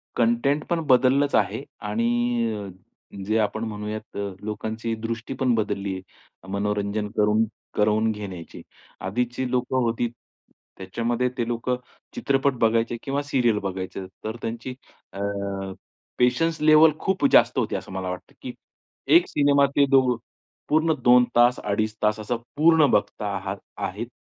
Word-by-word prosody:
Content 120 Hz, +6 st, +2 dB
पण 170 Hz, -, +1 dB
बदललंच 135 Hz, +3 st, +4 dB
आहे -, -, +1 dB, 0.3 s
आणि 115 Hz, +2 st, 0 dB, 0.5 s
अ, 100 Hz, -2 st, -6 dB, 0.6 s
जे 110 Hz, +2 st, +1 dB
आपण 110 Hz, +1 st, -1 dB
म्हणूयात, 105 Hz, 0 st, -6 dB, 0.2 s
लोकांची 110 Hz, +2 st, -4 dB
दृष्टी 115 Hz, +3 st, -5 dB
पण 130 Hz, -2 st, +2 dB
बदलली 105 Hz, -2 st, -1 dB
आहे, 95 Hz, -, -5 dB, 0.4 s
अ, -, -, -14 dB
मनोरंजन 105 Hz, +1 st, -1 dB
करून 105 Hz, +1 st, +3 dB, 0.3 s
करवून 110 Hz, +1 st, +2 dB
घेण्याची. 95 Hz, -6 st, -8 dB, 0.4 s
आधीची 120 Hz, +6 st, -2 dB
लोकं 125 Hz, +1 st, 0 dB
होती, 115 Hz, +1 st, 0 dB, 0.7 s
त्याच्यामध्ये 115 Hz, +6 st, -1 dB
ते 120 Hz, -2 st, -1 dB
लोकं 120 Hz, +1 st, -1 dB, 0.4 s
चित्रपट 135 Hz, 0 st, +1 dB
बघायचे 115 Hz, +1 st, +2 dB
किंवा 140 Hz, +1 st, -1 dB
सीरियल 125 Hz, -6 st, +1 dB
बघायचे, 95 Hz, 0 st, -4 dB, 0.2 s
तर 110 Hz, +1 st, -4 dB
त्यांची 120 Hz, +3 st, -5 dB, 0.4 s
अ, 95 Hz, -, -7 dB, 1.0 s
पेशन्स 140 Hz, +7 st, +2 dB
लेवल 155 Hz, +1 st, +7 dB
खूप 190 Hz, -1 st, 0 dB
जास्त -, -, +5 dB
होती, -, -, -1 dB
असं -, -, -6 dB
मला 95 Hz, -1 st, -4 dB
वाटतं, 90 Hz, -, -7 dB
की -, -, -6 dB, 0.6 s
एक 175 Hz, -, +6 dB
सिनेमा 140 Hz, -1 st, +3 dB
ते 140 Hz, -, +5 dB
दो 130 Hz, -2 st, +4 dB, 0.5 s
पूर्ण 160 Hz, +1 st, +3 dB
2 125 Hz, 0 st, +7 dB
तास, 120 Hz, +1 st, +5 dB
अडीच 110 Hz, +1 st, -1 dB
तास 105 Hz, 0 st, +2 dB
असं 110 Hz, +3 st, -2 dB, 0.2 s
पूर्ण 160 Hz, 0 st, +6 dB
बघता 105 Hz, 0 st, 0 dB
आहात 95 Hz, +1 st, -4 dB, 0.3 s
आहेत 100 Hz, +5 st, -3 dB
115 Hz, 140 wpm, -24 LUFS, 105-130 Hz, 1.0 s, लेवल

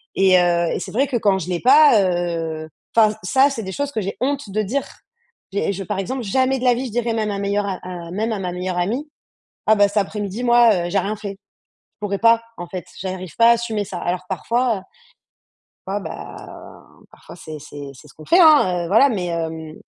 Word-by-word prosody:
et 190 Hz, -1 st, +5 dB
heu 175 Hz, -1 st, +2 dB
et -, -, -2 dB
c'est -, -, -7 dB
vrai 270 Hz, +6 st, +1 dB
que 255 Hz, -2 st, -1 dB
quand 200 Hz, -4 st, +2 dB
je 180 Hz, 0 st, -6 dB
l'ai 175 Hz, -, -1 dB
pas, 275 Hz, -3 st, +6 dB
heu 165 Hz, -3 st, -2 dB, 0.3 s
enfin 220 Hz, -2 st, +6 dB
ç -, -, -8 dB
ça, 265 Hz, +9 st, +4 dB
c'est 235 Hz, -5 st, -5 dB
des 190 Hz, -, -5 dB
choses 285 Hz, +7 st, -3 dB
que 220 Hz, -, -1 dB
j'ai 195 Hz, 0 st, -4 dB
honte 275 Hz, -4 st, -1 dB
de 215 Hz, +2 st, 0 dB
dire. 245 Hz, +7 st, -2 dB, 0.6 s
J'ai 200 Hz, 0 st, -1 dB
je 195 Hz, +1 st, -5 dB
par 190 Hz, -, -4 dB
exemple, 255 Hz, +7 st, -3 dB
jamais 260 Hz, +5 st, +1 dB
de -, -, -6 dB
la 245 Hz, -1 st, +5 dB
vie 255 Hz, +3 st, -3 dB
je -, -, -8 dB
dirais 235 Hz, +1 st, -1 dB
même 215 Hz, -2 st, -1 dB
à 200 Hz, -, -3 dB
meilleur 200 Hz, +1 st, 0 dB
a 190 Hz, -2 st, -3 dB
à 175 Hz, -2 st, -7 dB
même 220 Hz, +5 st, -2 dB
à 215 Hz, -, -1 dB
ma 180 Hz, -2 st, -3 dB
meilleure 180 Hz, 0 st, -3 dB
amie: 235 Hz, -, -2 dB, 0.6 s
«Ah, 220 Hz, -, +6 dB
bah, 205 Hz, -1 st, +5 dB
cet 205 Hz, -, -5 dB
après-midi 205 Hz, +2 st, -2 dB
moi, 240 Hz, -2 st, +6 dB
heu, -, -, -5 dB
j'ai 195 Hz, +2 st, +1 dB
rien 205 Hz, +4 st, -2 dB
fait». 200 Hz, -1 st, -6 dB
Je 200 Hz, +1 st, -26 dB, 0.4 s
pourrais 200 Hz, -1 st, -2 dB
pas, 230 Hz, 0 st, +4 dB, 0.2 s
en 175 Hz, -, -7 dB
fait, 185 Hz, -2 st, -6 dB, 0.2 s
j'arrive 185 Hz, -3 st, -6 dB
pas 230 Hz, -, +6 dB
à -, -, +8 dB
assumer 225 Hz, -3 st, -1 dB
ça. 190 Hz, -2 st, -6 dB
Alors 180 Hz, +1 st, -2 dB
parfois, 230 Hz, +5 st, 0 dB
heu -, -, -10 dB, 1.1 s
fois, 200 Hz, +2 st, -2 dB
bah, 160 Hz, -3 st, -8 dB, 0.8 s
parfois -, -, -14 dB
c'est 155 Hz, -1 st, -8 dB
c'est 145 Hz, -1 st, -9 dB
c'est 150 Hz, -, -16 dB
ce -, -, -17 dB
qu'on 155 Hz, -, -13 dB
fait, 350 Hz, -, +4 dB
hein, 235 Hz, -, +5 dB
heu. -, -, -5 dB
Voilà, 225 Hz, +8 st, +5 dB
mais 190 Hz, -7 st, -2 dB
hem 160 Hz, -2 st, -5 dB
200 Hz, 235 wpm, -21 LUFS, 180-235 Hz, 1.1 s, à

